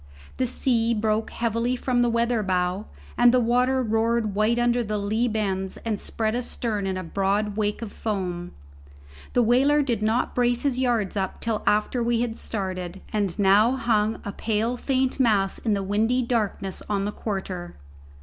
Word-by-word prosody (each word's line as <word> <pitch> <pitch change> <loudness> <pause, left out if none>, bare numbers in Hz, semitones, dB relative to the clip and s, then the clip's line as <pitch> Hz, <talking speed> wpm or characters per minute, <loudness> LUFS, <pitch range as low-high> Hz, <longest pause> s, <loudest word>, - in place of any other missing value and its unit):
The 255 - +1
sea 235 -2 +1
broke 215 0 0
heavily 230 +2 -1
from 250 -1 0
the 240 - +3
weather 235 0 +1
bow, 185 +1 -1 0.3
and 240 0 +7
the 255 - +4
water 250 +2 +2
roared 225 -1 +1
white 215 +3 +2
under 240 0 +2
the 215 -1 -2
lee 215 +4 0
bends 195 -4 -2
and 215 -3 -1
spread 220 -1 -1
astern 230 -4 -2
in 190 -1 -2
a 185 - -4
broad 200 +4 0
wake 210 +1 -1
of 215 - -7
foam. 180 -5 -3 0.8
The 245 - +4
whaler 275 +6 +4
did 235 -5 -1
not 220 +3 +1
brace 245 -1 +1
his 270 -3 0
yards 235 -7 0
up 190 -2 -2
till 225 -2 -1
after 215 +4 +2
we 235 0 +1
had 235 -2 -2
started, 185 -4 -4
and 205 -5 -1
now 205 +4 +5
hung 225 -3 +1
a 200 - -3
pale 220 +3 -1
faint 260 +1 0
mass 205 -6 +2
in 220 -3 0
the 200 - -2
windy 220 +6 +1
darkness 215 -5 -2
on 200 -1 0
the 205 - -2
quarter. 190 -5 -5
220 Hz, 175 wpm, -25 LUFS, 200-240 Hz, 0.8 s, and